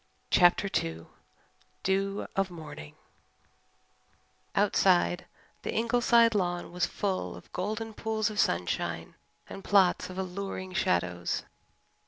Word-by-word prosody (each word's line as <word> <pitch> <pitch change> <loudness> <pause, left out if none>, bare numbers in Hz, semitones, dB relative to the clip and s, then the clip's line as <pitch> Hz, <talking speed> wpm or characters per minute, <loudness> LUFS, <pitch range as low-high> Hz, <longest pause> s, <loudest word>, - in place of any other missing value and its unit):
CHAPTER 175 +3 +5 0.2
II 80 0 -6 0.8
DEW 195 +1 0
OF 195 -1 +1
MORNING 150 - -9 1.6
Outside, 85 0 +3 0.3
the - - -4
Ingleside 235 0 +4
lawn 175 -4 -1
was 175 0 0
full 195 -2 -2
of - - -14
golden 215 +4 -3
pools 220 0 -1
of 210 - -4
sunshine 85 -1 0 0.3
and 195 - -9
plots 190 -3 +3
of 185 - -8
alluring 185 0 -4
shadows. 90 - 0
185 Hz, 105 wpm, -29 LUFS, -, 1.6 s, CHAPTER